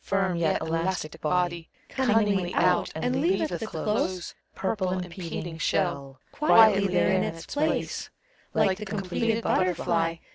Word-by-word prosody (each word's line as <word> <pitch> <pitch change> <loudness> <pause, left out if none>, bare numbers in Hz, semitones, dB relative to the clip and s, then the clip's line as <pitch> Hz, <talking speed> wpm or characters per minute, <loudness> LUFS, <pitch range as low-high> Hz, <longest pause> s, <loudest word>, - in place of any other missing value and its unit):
Firm 195 -2 0
yet 170 -2 +1
elastic 165 -1 -2
body 170 +1 -1 0.2
Cunningly 210 -8 +1
out, 180 0 +2
and 250 +11 -1
leaveth 330 -1 0
the 220 - -4
close. 185 0 -2 0.2
Purple, 190 -1 -1
impeding 175 -2 -5
shell 140 -7 -1
Quietly 220 -9 +5
there 180 -1 +2
in 190 0 +2
its 165 0 -5
place. 305 +2 -2 0.5
Like 190 0 +2
the 210 - -5
completed 210 +3 -1
butterfly. 170 -2 +1
185 Hz, 130 wpm, -26 LUFS, 170-210 Hz, 0.5 s, Quietly